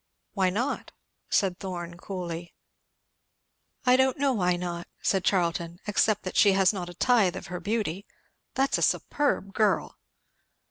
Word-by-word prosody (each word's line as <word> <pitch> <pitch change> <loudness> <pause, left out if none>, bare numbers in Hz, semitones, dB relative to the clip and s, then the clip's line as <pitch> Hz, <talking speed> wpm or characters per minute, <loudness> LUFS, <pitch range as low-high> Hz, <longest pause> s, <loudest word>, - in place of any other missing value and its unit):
"Why 190 -3 +2
not?" 240 +9 -2 0.4
said 190 -3 +1
Thorn 175 -3 -5
coolly. 175 -2 -6 1.3
"I 250 0 +6
don't 265 +2 +3
know 275 -1 +2
why 180 -5 +2
not," 175 -1 -5
said 190 -2 +1
Charlton, 170 -2 0
"except 210 0 +1
that - - -5
she 200 -2 +6
has 190 +1 +4
not 180 -3 -5
a 175 - -10
tithe 205 -4 +3
of 190 - -7
her 180 - -3
beauty. 205 -3 -2 0.5
That's 270 +1 +2
a - - -4
superb 280 -9 0
girl!" 215 -2 +1
190 Hz, 145 wpm, -27 LUFS, 175-220 Hz, 1.3 s, I